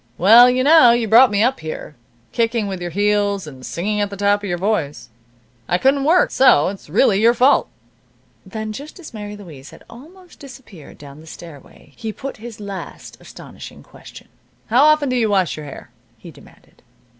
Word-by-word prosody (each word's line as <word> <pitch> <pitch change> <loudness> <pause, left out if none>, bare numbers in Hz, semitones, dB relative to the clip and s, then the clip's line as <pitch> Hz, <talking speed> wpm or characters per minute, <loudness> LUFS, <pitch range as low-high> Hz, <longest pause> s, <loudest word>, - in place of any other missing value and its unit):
"Well, 230 +7 +6
you 255 +1 0
know 300 -3 +6
you 235 -1 -1
brought 235 +4 +6
me 205 +1 0
up 255 +3 0
here, 155 -1 -8 0.4
kicking 230 -1 -1
with 190 -2 -6
your 175 - -5
heels, 205 +1 -1
and 135 -4 -13
singing 210 +9 -3
at 205 - -2
the 200 - -9
top 205 +1 +1
of 205 - -6
your 175 - -2
voice. 175 - -3 0.6
I 175 - +1
couldn't 270 +6 +1
work. 345 +4 +2
So 220 - +3
it's 195 -5 -11
really 200 - +2
your 235 +2 +3
fault." 255 +4 +2 0.7
Then, 220 -1 -7
just 290 - -11
as 320 -7 -12
Mary 210 -1 -8
Louise 155 -8 -13
had - - -17
almost 345 +10 -17
disappeared 240 - -14
down 145 +1 -14
the 160 - -17
stairway 160 -4 -14
he 220 -1 -6
put 275 +5 -9
his 230 0 -11
last 200 -2 -9
astonishing - - -13
question. - - -16 0.4
"How 255 +5 +4
often 305 -1 +3
do 255 - -2
you 230 -3 0
wash 190 -5 0
your 150 -1 -10
hair?" 140 - -12 0.3
he - - -13
demanded. - - -21
210 Hz, 190 wpm, -18 LUFS, 185-250 Hz, 0.7 s, Well